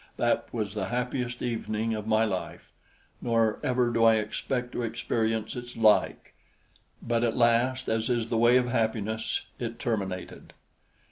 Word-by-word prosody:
That - - 0
was 105 -4 -3
the 105 -3 -2
happiest 125 0 -2
evening 115 -2 -2
of 105 -1 -4
my 110 0 +3
life; 95 -4 -5 0.5
nor 115 -2 +1
ever 125 -1 +1
do 115 0 +2
I 115 -1 +7
expect 125 +3 -2
to - - -3
experience 115 -1 -1
its 120 -1 -8
like; 110 -2 +3 0.7
but 115 0 0
at 115 0 0
last, 125 +2 +2
as 110 +1 0
is 120 -2 0
the 115 - -1
way 120 +2 +5
of 125 -1 +1
happiness, 110 -2 -1
it 115 -1 -4
terminated. 100 -7 -4
115 Hz, 150 wpm, -28 LUFS, 110-120 Hz, 0.7 s, I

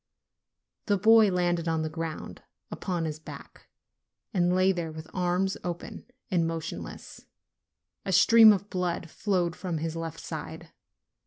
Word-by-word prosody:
The 205 -2 +3
boy 220 +1 +6
landed 175 -2 0
on 160 -1 0
the - - -1
ground, 160 0 -6 0.3
upon 175 -4 -3
his 155 -1 -4
back, 155 - -12 0.7
and 180 -2 +2
lay 185 +1 +4
there 170 -3 -3
with 155 0 -9
arms 180 +1 0
open 175 -1 -6 0.2
and 170 -3 +2
motionless; 165 -1 -7 0.8
a 195 - -3
stream 220 +4 +8
of 200 -1 -1
blood 175 -3 -2
flowed 180 -5 -1
from 180 -3 -4
his 160 +1 -3
left 165 -1 -5
side. - - -7
175 Hz, 140 wpm, -28 LUFS, 165-190 Hz, 0.8 s, stream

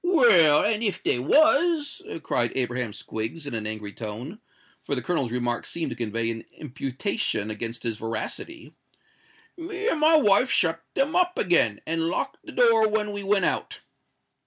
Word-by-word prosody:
"Well—and 215 - +4
if 200 -5 -2
they 120 - +1
was," 300 - +3 0.2
cried 120 -1 0
Abraham 125 -2 0
Squiggs, 110 +9 -5
in 140 - -5
an 110 -2 -2
angry 105 -2 -5
tone,—for 120 - -8
the - - -2
Colonel's 150 -10 -1
remark 120 -1 -2
seemed 170 -1 -4
to - - -4
convey 115 0 -1
an 115 0 -7
imputation 130 - -3
against 115 +2 -4
his 115 -3 -1
veracity,—"me 340 - -8
and 320 - -1
my 315 +1 +5
wife 250 -4 +4
shut 165 -1 +1
'em 275 +3 0
up 360 0 +2
again, 165 - +3
and 165 0 -1
locked 265 +9 -3
the - - -10
door 230 -3 +4
when 210 -1 -1
we 205 0 -5
went 200 0 +1
out." - - -2
170 Hz, 155 wpm, -25 LUFS, -, 0.2 s, my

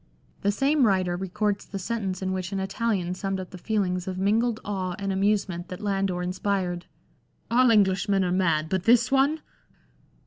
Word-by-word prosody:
(The 200 - +2
same 275 +3 +3
writer 185 -3 +1
records 200 +3 -2
the 200 - -5
sentence 195 -2 -3
in 190 - -1
which 185 -1 -3
an 195 - -2
Italian 190 -2 -1
summed 195 +1 -3
up 185 - -7
the 185 - -8
feelings 185 -4 -1
of 185 -1 -3
mingled 220 +4 +1
awe 185 -3 -2
and 195 -1 -2
amusement 195 -3 0
that 180 - -7
Landor 195 -3 -1
in 180 +1 -2
spired 185 -2 -2 0.3
— - - -34
"All 250 +1 +5
Englishmen 195 -2 +3
are 180 - 0
mad, 165 -4 +1
but 190 +2 -2
this 240 +1 +4
one 275 +4 +3
195 Hz, 180 wpm, -26 LUFS, 185-210 Hz, 0.3 s, All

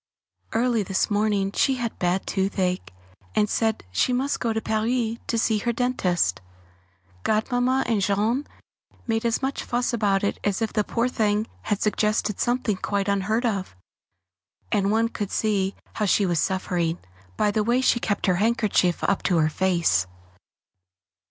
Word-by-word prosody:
Early 235 0 +2
this 195 +2 0
morning 205 -2 +1
she 265 +5 +2
had 240 -3 -4
bad 180 +1 0
toothache, 185 - -1 0.4
and 210 -1 +3
said 220 - 0
she 95 - +1
must 265 +3 0
go 230 - 0
to 220 - 0
Paris 225 +2 0
to 230 - 0
see 220 -1 +2
her 235 +3 0
dentist 210 - 0 0.8
Godmamma 245 - +1
and 225 -4 +1
Jean 215 +8 +1 0.6
made 225 -1 -1
as 235 +3 0
much 270 +1 -2
fuss 245 +1 -1
about 205 -4 +1
it 200 - -1
as 200 -2 0
if 225 -2 -2
the 210 - +2
poor 230 +3 0
thing 215 -3 +1 0.2
had 210 -2 -1
suggested 210 -1 0
something 240 -4 0
quite 200 +1 -1
unheard 205 +4 0
of; 195 - -2 1.0
and 200 -2 +2
one 225 +2 +2
could 205 -3 -4
see 200 -3 0 0.2
how 215 - -1
she 200 +1 +3
was 175 -3 +1
suffering, 175 -3 0 0.4
by 205 - +2
the 215 +1 +1
way 240 +3 +2
she 255 -2 +3
kept 205 -3 -1
her 185 -2 +2
handkerchief 205 -4 +1
up 200 - +1
to 180 - +1
her 155 -1 +3
face. 165 - +1
210 Hz, 160 wpm, -24 LUFS, 195-230 Hz, 1.0 s, and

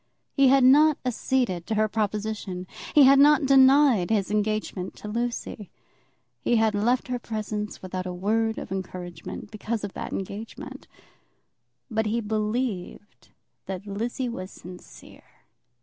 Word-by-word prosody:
He 275 -2 +5
had 270 0 +5
not 295 +4 +6
acceded 245 -7 -1
to 220 - -1
her 215 0 +2
proposition. 210 -3 -3 0.3
He 295 - +8
had 275 +1 +7
not 295 0 +6
denied 265 -6 +5
his 205 -3 0
engagement 210 -3 -2
to - - -9
Lucy. 230 -3 -4 0.7
He 240 - +1
had 220 -1 +3
left 235 +5 +1
her 250 -1 -2
presence 215 -3 -5
without 185 0 -4
a - - -3
word 220 +5 0
of - - -7
encouragement, 185 0 -6
because 220 0 -4
of 200 - -5
that - - -6
engagement. 200 +3 -7 1.0
But 220 0 0
he 225 +2 0
believed 215 -2 -3 0.4
that 190 +1 -5
Lizzie 230 +6 -3
was 190 -6 -6
sincere. 180 -1 -14
215 Hz, 135 wpm, -25 LUFS, 200-245 Hz, 1.0 s, He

